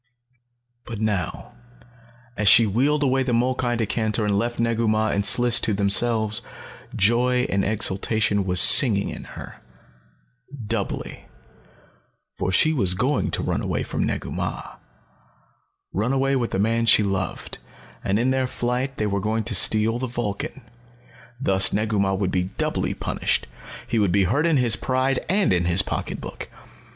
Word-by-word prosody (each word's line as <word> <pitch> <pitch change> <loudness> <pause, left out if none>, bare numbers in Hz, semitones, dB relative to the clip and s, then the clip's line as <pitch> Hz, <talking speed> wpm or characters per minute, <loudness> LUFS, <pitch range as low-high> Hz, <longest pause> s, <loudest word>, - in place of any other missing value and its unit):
But 115 -3 -8
now, 105 -4 -3 0.8
as 105 -2 -1
she 115 +3 +7
wheeled 140 +8 +1
away 135 -1 +1
the 130 -2 -1
molkai 125 0 0
decanter 110 0 -1
and 105 -1 0
left 120 +4 -2
Negu 115 0 0
Mah 110 0 +1
and 100 - -1
Sliss 120 +3 +5
to 105 - 0
themselves, 110 +2 +2 0.5
joy 125 +4 +2
and 100 0 0
exultation 105 0 0
was 90 -1 +2
singing 105 -7 +5
in - - -8
her. - - -11 1.0
Doubly. 105 -2 -4 1.1
For 95 - -1
she 155 +12 +3
was 95 - +2
going 130 +9 0
to - - -3
run - - -2
away - - -2
from - - -3
Negu - - -3
Mah, - - -5 1.2
run 110 +7 -1
away 135 0 +1
with 120 -3 -1
the - - -3
man 115 +3 0
she 105 - +5
loved, 95 -1 -4 0.4
and 95 - 0
in 125 +4 +1
their 130 -1 0
flight 125 +2 -3
they 105 - -1
were 100 -1 -1
going 110 +3 -2
to 115 - -3
steal 110 +4 +3
the 130 - -3
Vulcan. 120 +2 -5 0.8
Thus 95 -6 +3
Negu 105 0 -1
Mah 95 0 +1
would 95 -1 -2
be 90 -1 0
doubly - - -2
punished. - - -2 0.4
He 120 -2 -1
would 100 -4 +1
be 100 +1 +2
hurt 140 - +1
in 160 -3 +2
his 120 -3 +3
pride 130 +1 -1
and 195 - +2
in 90 -1 0
his 90 +2 +3
pocketbook. - - -6
110 Hz, 160 wpm, -22 LUFS, 100-125 Hz, 1.2 s, she